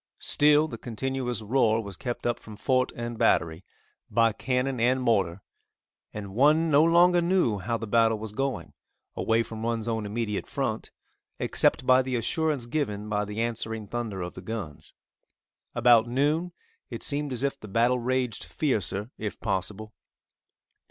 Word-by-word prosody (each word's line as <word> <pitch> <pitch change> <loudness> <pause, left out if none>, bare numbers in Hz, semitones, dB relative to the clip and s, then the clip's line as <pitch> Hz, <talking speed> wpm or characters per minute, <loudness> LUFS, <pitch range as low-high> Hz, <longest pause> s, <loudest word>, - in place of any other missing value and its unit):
Still 150 +1 +3
the 115 -7 -8
continuous 125 -1 -3
roar 115 -1 +2
was 100 -4 -6
kept 120 +5 -5
up 120 -1 0
from 110 - -11
fort 130 +3 +1
and 120 -1 -5
battery, 80 +2 +2 0.5
by 115 -1 +3
cannon 125 +2 -1
and 125 +3 +3
mortar, 100 -7 +1 0.7
and 100 -2 -7
one 155 +7 +4
no 145 +1 +6
longer 175 +1 +5
knew 170 - +1
how 115 +5 -2
the 115 - -5
battle 115 0 +3
was 110 0 -6
going, 130 - -3 0.4
away 115 +1 +1
from 110 0 -8
one's 115 -1 -2
own 110 -2 -2
immediate 105 -1 -3
front, - - -3 0.5
except - - +2
by 130 +1 +6
the 130 -1 -3
assurance 145 +2 -1
given 105 -6 -3
by 105 0 0
the 105 +2 -4
answering 110 -2 -4
thunder 110 -3 -4
of 90 - -6
the 95 - -9
guns. 95 -7 -7 0.8
About 120 -2 +5
noon, 150 +8 0 0.4
it - - -6
seemed 145 -1 +1
as 125 +1 -2
if 140 0 -1
the 110 - -10
battle 120 +5 +2
raged 125 -1 -1
fiercer 110 - -1
if 105 -2 -5
possible. 105 +1 -3
115 Hz, 160 wpm, -27 LUFS, 105-130 Hz, 0.8 s, no